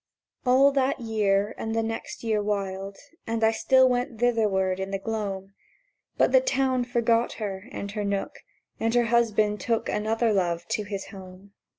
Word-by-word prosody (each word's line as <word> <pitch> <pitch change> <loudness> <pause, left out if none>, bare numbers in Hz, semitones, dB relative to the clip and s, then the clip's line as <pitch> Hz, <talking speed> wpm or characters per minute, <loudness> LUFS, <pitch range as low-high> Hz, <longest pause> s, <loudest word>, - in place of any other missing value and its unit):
All 265 +3 +6
that 275 0 +1
year 210 -3 +1
and 225 0 -3
the 225 - +1
next 225 +1 -5
year 220 -2 +1
whiled, 195 -1 -3 0.3
And 225 0 -1
I 220 - +5
still 260 +3 +4
went 245 -2 -1
thitherward 205 -6 +1
in 190 0 -3
the 195 - -2
gloam; 195 -2 -4 0.6
But - - +3
the - - +6
Town 265 - +1
forgot 235 -1 +1
her 195 -3 -5
and 200 -5 -5
her 210 0 -3
nook, 200 -1 -3 0.4
And 225 +1 0
her 240 - +4
husband 215 -3 +2
took 230 -2 -1
Another 220 +1 +1
Love 175 -3 0
to 210 - -1
his 200 -1 -6
home. 190 0 -12
220 Hz, 170 wpm, -26 LUFS, 195-235 Hz, 0.6 s, All